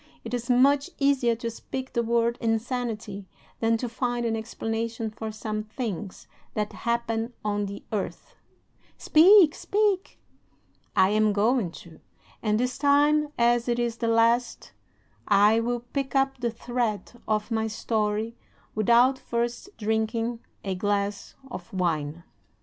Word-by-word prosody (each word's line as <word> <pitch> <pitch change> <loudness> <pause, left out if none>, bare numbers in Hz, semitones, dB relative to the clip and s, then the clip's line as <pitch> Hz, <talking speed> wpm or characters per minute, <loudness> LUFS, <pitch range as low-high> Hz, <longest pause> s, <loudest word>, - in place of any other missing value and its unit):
It 230 - -7
is 240 0 -3
much 275 +5 +4
easier 275 -4 +2
to 230 0 -4
speak 260 +3 -6
the 235 - +2
word 235 +1 +1
'insanity' 225 -3 -2 0.3
than 225 0 +2
to 245 - -3
find 240 0 -2
an 225 -1 0
explanation 225 0 -3
for 220 +1 -6
some 215 0 -4
things 215 -3 -5 0.3
that 210 -1 -2
happen 235 0 -2
on 205 -1 0
the 200 +1 -8
earth." 205 -3 -4 0.6
"Speak, 345 0 +7
speak!" 405 -2 0 0.8
"I 190 - +5
am 215 0 +3
going 215 0 +2 0.2
to; 165 -2 -15 0.4
and 210 0 +1
this 250 +1 -1
time, 290 +1 +3
as 240 0 +3
it 240 - +1
is 235 -1 -1
the 230 - -1
last, 230 +2 +2 0.6
I 210 +2 +5
will 240 +1 -1
pick 270 +3 -4
up 270 -1 +2
the 240 -1 0
thread 240 -1 -3
of 215 +1 -1
my 220 0 0
story 215 0 -1 0.4
without 240 +5 +4
first 240 +9 -3
drinking 220 +2 -1 0.2
a 195 - -2
glass 200 +1 -2 0.2
of 180 -4 -8
wine." 160 -6 -1
VI. 170 +1 -17
230 Hz, 140 wpm, -26 LUFS, 215-245 Hz, 0.8 s, Speak